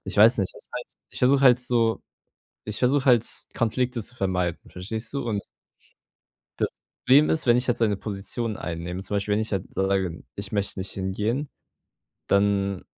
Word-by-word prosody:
ich 95 - -4
weiß 110 +4 +7
nicht, 95 -2 0
ist - - -9
halt - - -4 0.2
ich - - -7
versuche 135 +2 +4
halt 125 -2 +7
so 115 -2 +1 0.6
ich 105 0 -3
versuche 135 +2 +2
halt 120 -3 +5 0.3
Konflikte 120 +1 0
zu 120 - -6
vermeiden, 90 -5 -1
verstehst 110 +5 -5
du? 140 -3 -2
Und 105 -3 -1 1.2
das - - +1 0.4
Problem 140 +4 +6
ist, 160 - +1
wenn 120 0 +6
ich 125 - +1
jetzt 120 -1 0
eine 105 -3 +3
Position 105 +2 -4
einnehme, 90 +2 -5
zum 105 - -2
Beispiel, 100 +1 -1
wenn 105 - +1
ich 110 - -3
jetzt 95 -3 -3
sage: 95 -3 0
„Ich 100 -1 -6
möchte 100 -1 -1
nicht 95 - -5
hingehen.“ 105 +9 -2 0.8
Dann 100 -1 +2
105 Hz, 175 wpm, -25 LUFS, 95-120 Hz, 1.2 s, weiß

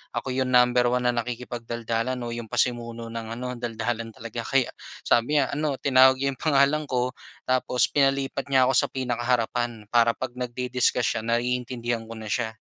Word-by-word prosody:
ako 130 +2 -2
'yung 130 0 0
number 125 -1 +4
1 125 0 +1
na 125 - +3
nakikipagdaldalan 120 0 -3
o 120 - -4
'yung 120 -1 -5
pasimuno 115 0 -2
ng 115 -1 -5
ano 125 +1 -5
daldalan 115 0 -3
talaga 115 +1 -7
kaya, 135 -2 +2 0.3
sabi 120 +6 +2
niya 135 - 0
ano, 150 -1 -1
tinawag 130 -1 +5
niya 140 +1 -1
'yung 135 - -11
pangalan 150 0 +3
ko 125 0 0 0.3
tapos 125 -1 +1
pinalipat 135 -1 +1
niya 135 -2 +4
ako - - +2
sa - - +3
pinakaharapan 120 -2 -1
para 115 -1 +4
'pag 130 -1 -4
nagdi-discuss 125 0 0
siya - - -5
naiintindihan 120 -1 -1
ko 115 - -8
na 110 -1 -7
siya. 110 -3 -1
125 Hz, 170 wpm, -25 LUFS, 115-130 Hz, 0.3 s, tinawag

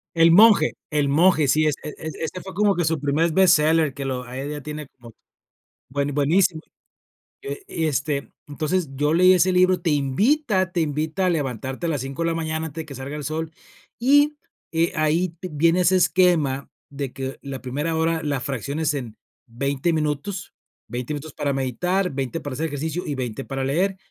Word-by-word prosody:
El 165 0 +6
monje. 200 -3 +6 0.2
El 150 -2 +1
monje, 160 0 +4
sí. 155 +4 +3
Es-e 150 0 -3
ese 160 +3 -5
fue 190 - -9
como 205 0 +2
que 175 - 0
su 160 0 0
primer 150 +4 +1
bestseller, 160 -4 +4
que 140 +1 -6
lo 130 -2 -3
ahí 130 +3 -6
ya 150 0 -5
tiene 150 +1 -7
como 120 -3 -16 0.8
bue 140 +2 -1
buenísimo. 160 +4 +2 0.8
Eh, 410 0 -6
y, 165 - -2
este, 145 -1 -1 0.2
entonces, 155 +3 -1
yo 150 +3 +1
leí 185 +2 +6
ese 185 +1 +3
libro. 185 0 +4
Te 170 - 0
invita 185 - +1
te 175 - 0
invita 155 +4 -1
a - - +3
levantarte 135 -1 -2
a - - 0
las 145 -5 -1
5 135 +4 -5
de 165 - +1
la 165 - 0
mañana 160 0 -2
antes 160 +1 -6
de - - -9
que 140 -3 -9
salga 135 +3 -6
el 150 - -5
sol. 160 +2 -3 0.5
Y, 290 +4 +4 0.3
eh, 165 +1 +1
ahí 160 +3 +1
vi 185 - -5
viene 165 +4 +3
ese 185 +1 +4
esquema 170 -6 +2 0.2
de 140 -2 -5
que 135 0 -5
la 135 -1 -6
primera 145 +6 -2
hora 160 0 +1
la 145 -2 -1
fracciones 140 +4 -2
en 125 -6 -6 0.3
20 140 +6 -1
minutos. 155 +5 -2 0.3
20 125 +4 -4
minutos 145 +1 -8
para 140 - -1
meditar, 180 +9 -1
20 135 +3 -3
para 145 -4 -6
hacer 155 +5 -2
ejercicio 160 +4 -3
y 145 - -2
20 125 -1 -4
para 135 -1 -4
leer. 180 +8 0
155 Hz, 190 wpm, -23 LUFS, 140-175 Hz, 0.8 s, El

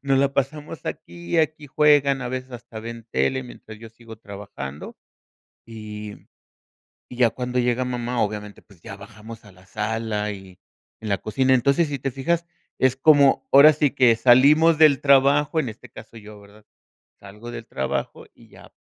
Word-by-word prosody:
nos 135 -1 +1
la 140 0 0
pasamos 150 +3 -4
aquí, 170 -1 -5
aquí 155 -1 -1
juegan, 145 -1 +3
a 125 - -5
veces, 130 +1 -6
hasta 115 -2 -10
ven 115 0 -9
tele 130 0 -1
mientras 110 -3 -13
yo 115 - -12
sigo 115 0 -14
trabajando, 100 -10 -9 0.7
y 105 -2 -9 0.9
y 125 - -10
ya 120 -3 +3
cuando 125 0 -4
llega 125 +1 0
mamá, 125 -1 -3
obviamente, 105 -1 -4
pues 95 -5 -23
ya - - -9
bajamos 105 +3 -13
a 100 - -16
la 90 0 -21
sala 105 +1 -3
y 95 -2 -11 0.4
en 110 - -7
la 100 - +1
cocina. 130 +6 0
Entonces, 140 +6 +2
si 140 -1 -4
te 135 +2 -3
fijas, 165 +7 -2 0.3
es 130 0 +2
como, 140 0 +3
ahora 145 +3 +8
sí 145 -2 0
que 125 -4 +4
salimos 145 +8 +4
del 155 -3 +4
trabajo, 140 +2 +3
en 130 -7 -1
este 120 +3 -14
caso 115 0 -13
yo, 105 0 -13
¿verdad?, 105 +1 -19 0.5
salgo 105 +4 -11
del 115 -1 -8
trabajo 65 0 -4
y - - -21
ya - - -17
120 Hz, 170 wpm, -22 LUFS, 105-140 Hz, 0.9 s, ahora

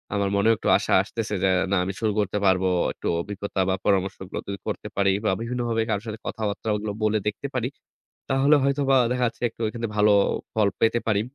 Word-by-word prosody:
আমার 100 -1 +1
মনেও 105 +3 +4
একটু - - -5
আশা - - -1
আসতেছে 110 +1 -4
যে 95 - +4 0.2
না - - +3
আমি 95 - -3
শুরু 110 -2 +1
করতে 105 0 0
পারবো। 95 0 +3 0.3
একটু - - -6
অভিজ্ঞতা 100 +1 -5
বা 95 - +2
পরামর্শগুলো 95 -1 -1
যদি 100 0 -4
করতে - - -4
পারি 100 -1 +3
বা - - +3
বিভিন্ন 120 +1 -3
ভাবে 115 -1 +1
কারো 105 -2 0
সাথে 110 0 -5
কথাবার্তাগুলো 105 0 -2
বলে 110 0 +2
দেখতে 105 +7 -2
পারি 125 -1 0 0.6
তাহলে 135 +3 +4
হয়তোবা 140 -1 +2
দেখা 125 0 +1
যাচ্ছে 115 - -6
একটু 115 - -28
এখান 115 +2 -7
থেকে 115 -2 -2
ভালো 105 0 +5 0.4
ফল 110 -2 +3
পেতে 115 +1 +3
পারি। 105 -3 +2
105 Hz, 200 wpm, -24 LUFS, 100-115 Hz, 0.6 s, ভালো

